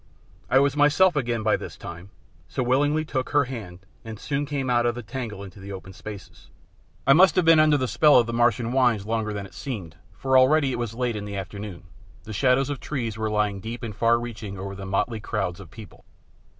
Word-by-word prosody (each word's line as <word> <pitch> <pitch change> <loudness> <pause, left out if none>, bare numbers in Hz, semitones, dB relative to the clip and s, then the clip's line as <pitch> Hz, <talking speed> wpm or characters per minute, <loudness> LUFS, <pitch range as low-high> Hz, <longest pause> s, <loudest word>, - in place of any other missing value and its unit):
I 130 - +4
was 140 +1 +3
myself 150 +5 +4
again 120 -5 -1
by 110 - +3
this - - -9
time, 85 +3 -9 0.4
so 130 - -2
willingly 145 +5 +2
took 130 -4 -3
her 145 -1 +3
hand, 100 -8 -8 0.2
and 110 -1 -8
soon 140 +6 -3
came 140 -2 -2
out 120 -1 +2
of 120 - 0
the 120 - -6
tangle 105 -2 -6
into 100 0 -11
the 100 +1 -9
open 95 0 -8
spaces. 100 0 -11 0.6
I 135 - +7
must 185 +6 +6
have 185 -3 +3
been 165 -1 +7
under 155 -1 +5
the 130 -2 -1
spell 150 +3 +5
of 120 - +5
the 115 - -5
Martian 120 0 +2
wines 120 -6 +2
longer 110 -1 -1
than 100 -1 -5
it - - -14
seemed, 95 - -6 0.2
for 130 +7 +3
already 140 +1 +4
it 120 - -3
was 115 -2 -4
late 120 -2 -1
in 105 -1 -5
the 100 -1 -6
afternoon, 95 -1 -7 0.4
the 110 - -8
shadows 130 +6 +2
of 140 - -4
trees 120 -7 -4
were 110 0 -2
lying 105 -2 0
deep 115 +4 -7
and 110 -3 -5
far 115 +2 +3
reaching 110 -4 -7
over 100 +1 -6
the 95 0 -8
motley 110 +4 -1
crowds 90 -3 -3
of 95 -5 -11
people. 110 +3 -13
115 Hz, 225 wpm, -25 LUFS, 100-130 Hz, 0.6 s, I